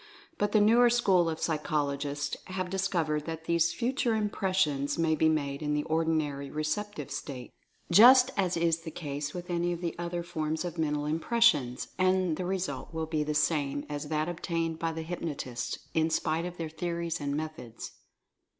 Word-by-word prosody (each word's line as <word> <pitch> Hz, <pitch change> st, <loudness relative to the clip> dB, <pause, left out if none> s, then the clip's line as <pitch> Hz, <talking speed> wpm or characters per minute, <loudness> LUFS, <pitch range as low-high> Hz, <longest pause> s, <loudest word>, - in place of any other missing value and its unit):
But 205 Hz, 0 st, +1 dB
the 215 Hz, -, +5 dB
newer 235 Hz, +4 st, +6 dB
school 195 Hz, -8 st, +3 dB
of 160 Hz, 0 st, -4 dB
psychologists 145 Hz, -2 st, -1 dB
have 185 Hz, -1 st, -4 dB
discovered 170 Hz, -6 st, 0 dB
that 160 Hz, 0 st, -5 dB
these 170 Hz, 0 st, +2 dB
Future 245 Hz, 0 st, 0 dB
Impressions 190 Hz, -9 st, 0 dB
may 165 Hz, -1 st, +2 dB
be 160 Hz, +1 st, +3 dB
made 140 Hz, -2 st, -1 dB
in 150 Hz, -1 st, 0 dB
the 150 Hz, -, 0 dB
ordinary 155 Hz, -4 st, 0 dB
receptive 155 Hz, +2 st, -3 dB
state, 125 Hz, -4 st, -6 dB, 0.4 s
just 250 Hz, +7 st, +8 dB
as 185 Hz, -3 st, +1 dB
is 165 Hz, -1 st, +2 dB
the 165 Hz, 0 st, -7 dB
case 145 Hz, -1 st, -5 dB
with 180 Hz, 0 st, -6 dB
any 175 Hz, 0 st, 0 dB
of 170 Hz, -, -5 dB
the 170 Hz, -2 st, -2 dB
other 175 Hz, 0 st, -3 dB
forms 160 Hz, -1 st, -2 dB
of 170 Hz, -1 st, -5 dB
Mental 150 Hz, -2 st, 0 dB
Impressions, 155 Hz, -, +2 dB
and 185 Hz, -2 st, +2 dB
the 180 Hz, -, -4 dB
result 180 Hz, -7 st, -3 dB
will 160 Hz, -1 st, -2 dB
be 155 Hz, -1 st, -1 dB
the 150 Hz, 0 st, -2 dB
same 145 Hz, -2 st, +1 dB
as 145 Hz, 0 st, -4 dB
that 155 Hz, +1 st, 0 dB
obtained 165 Hz, -1 st, -2 dB
by 165 Hz, 0 st, -1 dB
the 160 Hz, 0 st, -5 dB
hypnotists, 160 Hz, -7 st, -4 dB, 0.2 s
in 160 Hz, 0 st, +2 dB
spite 160 Hz, +1 st, 0 dB
of 180 Hz, 0 st, -6 dB
their 165 Hz, -, -3 dB
theories 170 Hz, 0 st, -3 dB
and 140 Hz, 0 st, -1 dB
methods. 155 Hz, -7 st, -6 dB
160 Hz, 175 wpm, -29 LUFS, 150-180 Hz, 0.4 s, just